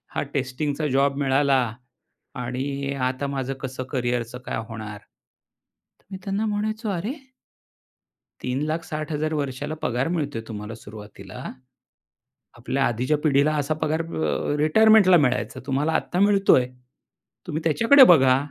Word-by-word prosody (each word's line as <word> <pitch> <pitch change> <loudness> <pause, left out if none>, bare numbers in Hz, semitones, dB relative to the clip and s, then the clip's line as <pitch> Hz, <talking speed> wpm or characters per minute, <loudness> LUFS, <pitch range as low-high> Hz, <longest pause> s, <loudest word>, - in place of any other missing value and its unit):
हा - - 0
टेस्टिंगचा 140 +3 -2
जॉब 140 0 +2
मिळाला 135 0 +3 0.8
आणि 140 +3 -3
आता 130 +2 -3
माझं 135 -1 -3
कसं 130 -1 -5
करियरच 120 -2 -2
काय - - -3
होणार?" 110 -2 -7
तर - - -32 0.9
मी 190 - -5
त्यांना 200 +2 -1
म्हणायचो, 215 +1 -2
"अरे" 195 +6 -2 1.3
"₹3,60,000 155 +3 -2
वर्षाला 145 +1 -3
पगार 125 +4 0
मिळतोय 145 -9 -2
तुम्हाला 105 +1 -6
सुरुवातीला, 110 -1 -11 1.2
आपल्या 135 +3 -1
आधीच्या 125 +6 0
पिढीला 145 +1 +3
असा 155 +3 -1
पगार 155 +1 0
अ, 160 -2 -2
रिटायरमेंटला 190 +4 +6
मिळायचा 125 0 -1
तुम्हाला 145 +4 0
आता 175 +2 -1
मिळतोय. 200 -10 +4 0.8
तुम्ही 155 +2 -3
त्याच्याकडे 230 - +6
बघा 130 -5 +5
140 Hz, 115 wpm, -24 LUFS, 130-160 Hz, 1.3 s, रिटायरमेंटला